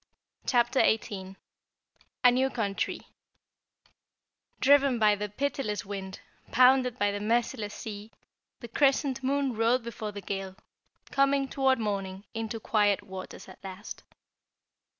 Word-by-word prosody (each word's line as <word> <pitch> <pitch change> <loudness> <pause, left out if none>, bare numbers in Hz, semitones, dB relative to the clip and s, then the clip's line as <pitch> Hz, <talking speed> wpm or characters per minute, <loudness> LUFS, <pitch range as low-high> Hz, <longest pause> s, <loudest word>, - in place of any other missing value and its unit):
CHAPTER 240 +1 +3
18 195 -3 0 0.9
A 245 - +8
New 260 +2 +2
Country 220 -2 -2 1.6
Driven 280 -1 +5
by 215 -2 +5
the 205 0 -3
pitiless 215 -3 -2
wind, 190 -1 -6 0.3
pounded 255 -1 +5
by 205 -2 +2
the 205 - -3
merciless 220 0 -1
sea, 215 -1 -7 0.5
the 235 - -7
Crescent 270 +1 +2
Moon 270 -1 0
rode 230 +3 +2
before 225 -2 -5
the 205 - -7
gale, 195 0 -5 0.6
coming, 275 0 +2
toward 265 -1 +2
morning, 195 -3 -3
into 225 0 -4
quiet 205 -2 +2
waters 190 -1 -9
at 190 - -14
last. 195 +2 -8
225 Hz, 120 wpm, -28 LUFS, 205-260 Hz, 1.6 s, A